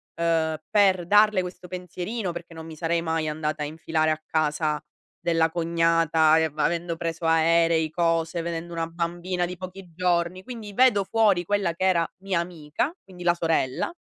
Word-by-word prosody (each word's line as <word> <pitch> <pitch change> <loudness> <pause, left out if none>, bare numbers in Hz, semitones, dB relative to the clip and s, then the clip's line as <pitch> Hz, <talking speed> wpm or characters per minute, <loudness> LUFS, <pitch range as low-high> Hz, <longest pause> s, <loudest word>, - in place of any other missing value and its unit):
uhm, 165 -2 +1
per 190 -4 +3
darle 210 0 +5
questo 180 0 -8
pensierino, 180 +2 -4
perché 170 -1 -9
non 160 0 -9
mi 160 -1 -9
sarei 165 +1 0
mai 160 -1 -1
andata 150 0 -3
a - - -1
infilare 155 0 0
a 155 0 -2
casa 150 -1 0 0.4
della 165 -1 +1
cognata 165 -1 +3
e 160 - +3
av 155 -1 -7
avendo 170 +1 0
preso 165 -1 -4
aerei, 165 0 +3
cose, 165 0 0
vedendo 170 0 -5
una 165 0 -2
bambina 175 +2 -2
di 180 +1 -6
pochi 185 +1 -9
giorni. 180 0 0
Quindi 225 -5 -8
vedo 210 -5 +4
fuori 205 -6 +2
quella 200 -4 0
che 185 +3 -2
era 170 -3 +3 0.2
mia 190 -3 0
amica, 170 - -3
quindi 180 -2 -11
la 175 0 +4
sorella. 165 - 0
170 Hz, 170 wpm, -25 LUFS, 160-180 Hz, 0.4 s, darle